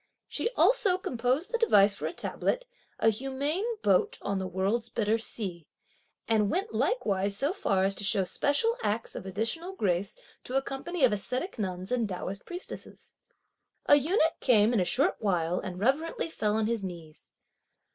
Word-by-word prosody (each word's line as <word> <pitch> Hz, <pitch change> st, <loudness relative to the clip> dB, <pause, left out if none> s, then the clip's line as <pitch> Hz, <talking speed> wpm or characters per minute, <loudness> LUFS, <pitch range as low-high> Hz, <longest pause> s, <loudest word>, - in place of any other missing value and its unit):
She -, -, -1 dB
also 415 Hz, -7 st, +4 dB
composed 260 Hz, -, -1 dB
the 470 Hz, -, 0 dB
device 205 Hz, -, +5 dB
for -, -, -3 dB
a -, -, -3 dB
tablet, -, -, -2 dB, 0.3 s
"a 225 Hz, -, +4 dB
humane 270 Hz, -, -2 dB, 0.2 s
boat 190 Hz, -3 st, +3 dB
on 200 Hz, -1 st, -1 dB
the 190 Hz, -, -3 dB
(world's) 195 Hz, +6 st, -1 dB
bitter 225 Hz, 0 st, +1 dB
sea," 185 Hz, -8 st, -6 dB, 0.6 s
and 215 Hz, -3 st, +3 dB
went 390 Hz, -, -1 dB
likewise 200 Hz, -, 0 dB
so 285 Hz, -, +1 dB
far 195 Hz, -, +1 dB
as 195 Hz, +1 st, +2 dB
to -, -, -4 dB
show 200 Hz, -1 st, +2 dB
special 290 Hz, -, +1 dB
acts 220 Hz, +2 st, -2 dB
of -, -, -7 dB
additional 230 Hz, -, -3 dB
grace 195 Hz, -, -1 dB, 0.3 s
to 255 Hz, -, -5 dB
a -, -, +3 dB
company 285 Hz, +5 st, -3 dB
of 255 Hz, -, +6 dB
ascetic 255 Hz, -, -3 dB
nuns 185 Hz, -1 st, -3 dB
and 235 Hz, -4 st, +1 dB
Taoist 190 Hz, +1 st, -5 dB
priestesses. 355 Hz, +1 st, -9 dB, 0.7 s
A 290 Hz, -, +7 dB
eunuch 320 Hz, +3 st, +2 dB
came 225 Hz, -2 st, +4 dB
in 230 Hz, -, +3 dB
a 180 Hz, -, +2 dB
short 280 Hz, -, +1 dB
while 180 Hz, -4 st, 0 dB
and 185 Hz, -2 st, -6 dB
reverently 305 Hz, +8 st, 0 dB
fell 210 Hz, -7 st, 0 dB
on 220 Hz, -1 st, +1 dB
his 225 Hz, -2 st, -1 dB
knees. 170 Hz, -4 st, -9 dB
225 Hz, 170 wpm, -29 LUFS, 195-300 Hz, 0.7 s, A